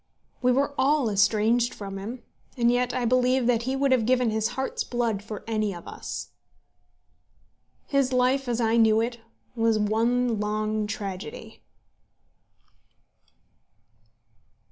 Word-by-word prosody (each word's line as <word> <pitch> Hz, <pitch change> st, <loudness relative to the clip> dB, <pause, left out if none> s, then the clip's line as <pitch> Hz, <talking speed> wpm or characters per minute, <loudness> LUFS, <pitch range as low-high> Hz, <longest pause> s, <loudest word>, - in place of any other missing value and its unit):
We 250 Hz, 0 st, +3 dB
were 280 Hz, +3 st, +1 dB
all 270 Hz, -3 st, +2 dB
estranged 215 Hz, +4 st, +2 dB
from 195 Hz, -1 st, -6 dB
him, 235 Hz, +6 st, -7 dB, 0.3 s
and 235 Hz, -1 st, +3 dB
yet 245 Hz, 0 st, +1 dB
I 255 Hz, -2 st, -1 dB
believe 255 Hz, +1 st, +2 dB
that 235 Hz, -1 st, +2 dB
he 265 Hz, -, 0 dB
would 275 Hz, 0 st, +1 dB
have 240 Hz, -4 st, +2 dB
given 250 Hz, -2 st, +2 dB
his 220 Hz, 0 st, 0 dB
heart's 265 Hz, -, -2 dB
blood 235 Hz, -4 st, -1 dB
for 210 Hz, 0 st, -8 dB
any 215 Hz, -3 st, -1 dB
of 170 Hz, -, -11 dB
us. -, -, -6 dB, 1.6 s
His 275 Hz, -2 st, +1 dB
life 255 Hz, +1 st, +2 dB
as 240 Hz, -1 st, -1 dB
I 230 Hz, 0 st, +2 dB
knew 220 Hz, -1 st, +5 dB
it 235 Hz, +1 st, -2 dB, 0.4 s
was 225 Hz, -1 st, +2 dB
one 230 Hz, +2 st, +1 dB
long 215 Hz, 0 st, -1 dB
tragedy. 195 Hz, -6 st, -7 dB
230 Hz, 130 wpm, -26 LUFS, 215-250 Hz, 1.6 s, knew